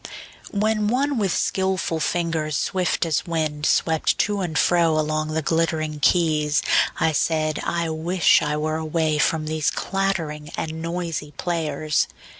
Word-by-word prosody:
WHEN 215 0 0
one 265 +3 +1
with 195 -4 +1
skillful 190 -4 0
fingers 160 -2 -1
swift 180 -2 0
as 160 -1 -1
wind 155 -3 -1
Swept 160 -1 +2
to 205 -1 0
and 165 -4 -2
fro 170 -3 +3
along 155 0 0
the 155 0 -2
glittering 155 0 0
keys, 150 -3 +2 0.4
I 160 - +3
said: 155 0 0
I 170 -1 -1
wish 170 +3 +3
I 150 -1 -1
were 155 +1 -1
away 155 -1 0
from 155 +1 +1
these 155 -1 0
Clattering 170 -6 -2
and 160 0 -4
noisy 165 -4 -4
players! 155 -3 -1
160 Hz, 140 wpm, -23 LUFS, 155-175 Hz, 0.4 s, fro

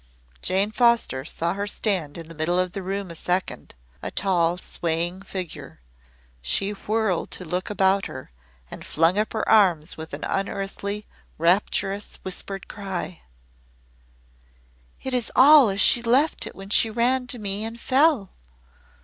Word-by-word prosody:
Jane 195 +3 +1
Foster 235 - +2
saw 170 +1 -2
her 200 +1 -3
stand 185 -8 -1
in 165 -1 -8
the 165 - -11
middle 165 +3 0
of 185 0 +1
the 195 - -5
room 195 0 -4
a - - -8
second, 180 - -2 0.3
a - - -4
tall, 175 -3 +1
swaying 175 +1 -2
figure. 185 -3 -7 0.6
She 195 - +1
whirled 210 -2 -1
to 185 - -6
look 180 +3 -3
about 195 -1 +2
her 130 - -10 0.4
and - - -8
flung 165 +5 +2
up 215 - -1
her 220 - -2
arms 180 -7 +3
with 160 0 -6
an - - -10
unearthly 200 +1 -3 0.3
rapturous, 195 +4 +1
whispered 190 +1 -5
cry: 190 -4 -6 1.8
"It 265 - -3
is 245 -3 0
all 280 -2 +8
as 195 0 -2
she 240 - +6
left 260 +7 +2
it - - -10
when 195 +1 -10
she 225 - +5
ran 250 +3 +1
to 250 - -4
me 205 -1 -3
and 225 +1 -5
fell. 265 - +2
195 Hz, 150 wpm, -24 LUFS, 175-220 Hz, 1.8 s, all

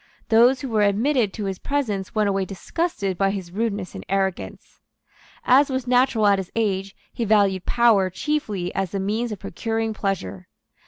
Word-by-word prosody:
Those 240 +3 +5
who 270 - -4
were 220 -2 +1
admitted 215 +3 +2
to 210 - -4
his 195 -2 -4
presence 225 -10 -2
went 215 -1 +2
away 195 -1 0
disgusted 195 - -3
by 195 0 +3
his 190 -3 -5
rudeness 205 -2 -3
and - - -8
arrogance. 190 -1 -3 0.7
As 270 +3 +5
was 260 -2 -2
natural 250 -3 +3
at 200 -1 +4
his 190 - -6
age, 195 -3 -1 0.2
he 235 - -2
valued 200 -4 +2
power 225 -6 +4
chiefly 205 -4 -2
as 195 -2 -1
the 195 - -3
means 215 +5 -1
of 210 - -4
procuring 225 +3 -3
pleasure. 130 - -4
205 Hz, 170 wpm, -23 LUFS, 195-235 Hz, 0.7 s, Those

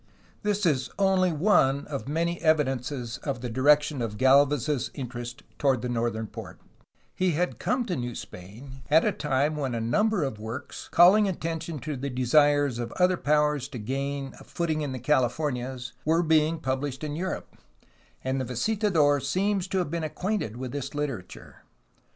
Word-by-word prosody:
This 205 -1 0
is 135 -6 +1
only 190 -2 +3
one 145 -5 +3
of 140 -3 -5
many 170 +3 -1
evidences 135 -5 0
of 135 -4 -4
the 125 -2 -4
di 130 - -3
rection 150 -1 +4
of 110 -2 -3
Galvez's 140 +1 +3
interest 120 -3 -6 0.2
toward 135 -4 +2
the 125 - -2
northern 115 -2 -1
port; - - -9 0.5
he 185 -2 +1
had 180 +4 -1
come 250 0 0
to 180 - -2
New 120 -2 -4
Spain 120 +9 -10
at 160 +2 +5
a 210 - +3
time 150 -3 0
when 135 -5 -2
a - - -1
number 175 - +1
of 135 -6 -3
works 110 +5 -7
calling 195 +5 +6
attention 165 -3 -3
to 150 +4 -4
the 135 +2 -4
desires 140 +1 +3
of 120 -1 -4
other 180 0 +3
powers 150 -3 +1
to 130 - -8
gain 135 +4 -3
a - - -12
footing 160 -3 -2
in 145 -3 -2
the 130 - -4
Californias 130 -1 -1
were 165 +3 +2
being 160 0 +3
published 135 -1 -3
in 150 -1 -3
Europe, 185 +3 -4 0.7
and 130 0 -1
the - - -2
visitador 155 - +2
seems 190 +6 0
to 190 - -2
have 180 -5 -1
been 170 -1 -2
acquainted 170 - -2
with 130 -1 -5
this 140 0 -5
literature. 135 -11 -5
145 Hz, 170 wpm, -27 LUFS, 130-165 Hz, 0.7 s, calling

